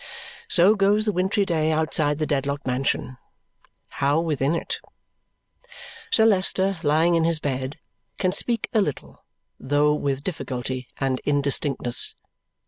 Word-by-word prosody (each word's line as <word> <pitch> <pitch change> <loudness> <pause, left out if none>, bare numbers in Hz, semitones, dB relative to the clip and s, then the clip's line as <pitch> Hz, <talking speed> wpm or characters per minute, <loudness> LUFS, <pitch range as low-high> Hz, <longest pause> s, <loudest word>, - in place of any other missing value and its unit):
So 185 +4 +5
goes 205 +1 +2
the 210 - +1
wintry 190 +2 0
day 160 -3 0
outside 155 -2 +1
the 155 - -1
Dedlock 140 0 -2
mansion. 130 0 -2 0.8
How 145 +3 +3
within 155 -2 0
it? - - -3 1.3
Sir 220 - +4
Leicester, 195 -2 +2
lying 160 +2 +2
in 165 -1 +2
his 165 -1 +2
bed, 135 -1 -3 0.4
can 185 -2 +1
speak 230 +3 +1
a 220 - +4
little, 150 -8 -5 0.4
though 145 +2 +2
with 140 -2 -2
difficulty 130 -6 -4
and 135 -2 -1
indistinctness. 140 -3 0
155 Hz, 130 wpm, -23 LUFS, 140-185 Hz, 1.3 s, So